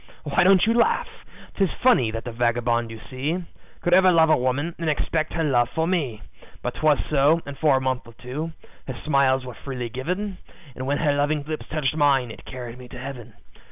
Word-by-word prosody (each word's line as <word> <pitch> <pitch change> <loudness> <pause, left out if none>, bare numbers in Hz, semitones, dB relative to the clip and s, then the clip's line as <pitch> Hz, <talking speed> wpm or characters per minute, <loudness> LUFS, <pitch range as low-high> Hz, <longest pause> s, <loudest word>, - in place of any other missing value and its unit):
"Why 150 +3 +2
don't 190 0 +5
you 225 - +3
laugh? 235 0 +2 0.5
'Tis 195 -3 +2
funny 240 - +5
that 115 +1 -4
the 120 - -5
vagabond 120 0 0
you 115 0 -8
see 140 +6 -2 0.4
Could 175 - +1
ever 185 0 +6
love 160 -2 +5
a - - +7
woman, 130 +7 -1
and 165 -2 -1
expect 155 +1 -1
her 165 - 0
love 120 -5 +2
for 160 +4 -1
me; 145 - -1 0.4
But 125 - -2
'twas 155 -2 +3
so, 150 +3 +4
and 140 - -7
for 145 -2 +3
a - - -1
month 130 -2 -2
or 115 - -13
two, 145 +8 -5 0.4
her 130 -3 -5
smiles 135 -3 +3
were 125 - -7
freely 125 -2 -6
given, 180 - -3 0.4
And 130 - -5
when 145 +1 +1
her 145 -2 +2
loving 145 +1 0
lips 155 +1 -5
touched 155 -1 -1
mine, 140 -5 +3
it - - -12
carried 125 -1 -8
me 125 - -10
to 125 - -10
Heaven. 125 -2 -8
140 Hz, 210 wpm, -24 LUFS, 125-160 Hz, 0.5 s, a